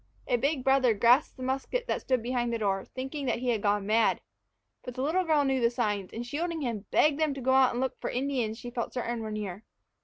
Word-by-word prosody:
A - - +2
big 270 +2 0
brother 265 -4 +4
grasped 240 +9 +4
the 255 - -7
musket 270 - -2
that - - -2
stood 255 -3 0
behind 240 -1 -1
the 230 - 0
door, 195 -3 -1
thinking 270 +2 -5
that 235 - +1
he 250 +1 -2
had 225 -4 +1
gone 205 -1 +1
mad. 220 +2 +3 0.6
But 250 - -7
the 255 - -2
little 340 +6 +1
girl 310 -4 +3
knew 265 -1 +1
the 235 - +4
signs, 210 -6 -2
and, 235 +2 -5
shielding 325 +5 -3
him, 230 -6 -3
begged 300 -1 +3
them 310 -3 +1
to - - -6
go 260 +1 +1
out 265 -1 +6
and 245 - -3
look 260 -1 -2
for - - -2
the - - -3
Indians 250 -5 -1
she 245 0 -8
felt 235 -1 -4
certain 240 -1 -2
were 220 - -4
near. 210 -2 -5
250 Hz, 250 wpm, -29 LUFS, 225-270 Hz, 0.6 s, out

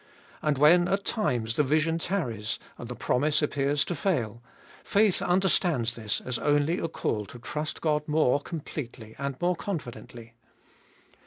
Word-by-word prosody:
And 150 -2 +1
when 170 +5 +6
at 195 +2 0
times 120 - -1
the 150 - +4
vision 155 +4 +1
tarries, 120 - -2 0.2
and 120 - -7
the 125 - -5
promise 150 +7 +1
appears 145 0 +1
to - - -2
fail, 125 - -1 0.4
faith 205 -2 +3
understands 175 - +2
this 110 -2 -2
as 125 -1 -3
only 145 +4 +2
a - - -1
call 105 -9 -2
to 90 - -10
trust 150 +5 -4
God 150 -2 0
more 150 -3 +3
completely 135 -8 -7
and 140 -1 -3
more 175 +1 +2
confidently. 120 - -6
150 Hz, 150 wpm, -28 LUFS, 120-165 Hz, 0.4 s, when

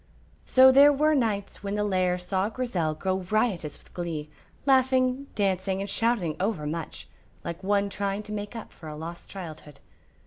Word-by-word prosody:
So 260 0 +8
there 280 +2 +8
were 305 +2 +3
nights 220 -7 -1
when 200 0 -3
the 210 - 0
lair 185 -3 +1
saw 190 +3 -1
Grizel 190 -11 -1
go 190 +3 -1
riotous 185 -5 -1
with - - -22
glee, 160 -4 -4 0.3
laughing, 260 0 +3
dancing, 190 -1 0
and 200 - -3
shouting 205 -7 +1
over 190 -5 -1
much, 160 +1 -5 0.4
like 170 +2 -6
one 200 +1 +2
trying 200 +1 -2
to 210 - -9
make 205 +1 -5
up 225 - -7
for 160 - -10
a 150 - -7
lost 165 +3 -8
childhood. 155 -6 -9
200 Hz, 170 wpm, -27 LUFS, 175-230 Hz, 0.4 s, So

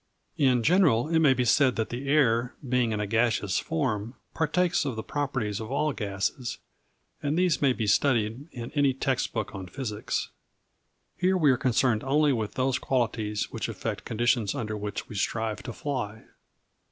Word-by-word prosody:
In 130 -4 +3
general, 155 -7 +4
it 165 -1 +3
may 145 -5 +5
be 125 0 +1
said 130 +1 +4
that 110 - -1
the 130 +3 -5
air, 125 -4 +3
being 125 -2 +2
in 105 - -1
a 105 - -1
gaseous 110 -2 +1
form, 125 -7 -2 0.2
partakes 175 +3 +1
of 135 -5 -3
the 110 - -4
properties 135 -8 -2
of 110 +2 -6
all 150 +2 +1
gases 105 +4 -3 0.6
and 145 +2 -1
these 180 -6 +2
may 140 -2 +4
be 115 -3 -2
studied 115 - +1
in 120 -2 -7
any 140 -3 +2
text 135 -1 -1
book - - -3
on 95 -2 -6
physics, 105 +1 -3 0.9
Here 185 +1 +2
we 150 -6 +5
are - - +3
concerned 125 -2 +1
only 145 +2 +3
with 110 -4 -3
those 130 0 +1
qualities 110 -5 -1
which - - -3
affect - - -4
conditions 115 -2 +1
under 110 -5 -3
which 105 0 -5
we - - -9
strive 110 +2 -1
to 120 - -6
fly. 115 -5 -4
125 Hz, 175 wpm, -27 LUFS, 110-140 Hz, 0.9 s, may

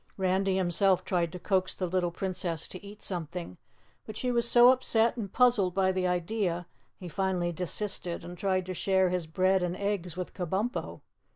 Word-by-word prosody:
Randy 190 0 +1
himself 185 +1 +2
tried 170 -3 0
to 180 - -6
coax 185 0 0
the 185 - -2
little 180 0 0
Princess 175 -2 -3
to 185 - -8
eat 205 +1 -11
something, 170 - -5 0.5
but 215 -1 -8
she 250 - -1
was 235 -1 +3
so 245 +1 +8
upset 235 -3 +2
and 210 -6 -5
puzzled 220 -8 +3
by 190 -1 +3
the 185 -1 0
idea, 180 0 -1 0.3
he 180 - -9
finally 180 0 -1
desisted 180 0 -2
and 175 +1 -8
tried 185 0 0
to 185 - -4
share 190 0 +2
his 180 -2 -2
bread 185 +3 +2
and 180 0 -2
eggs 195 -4 -2
with 180 - -5
Kabumpo. 190 +7 -3
185 Hz, 180 wpm, -29 LUFS, 175-200 Hz, 0.5 s, so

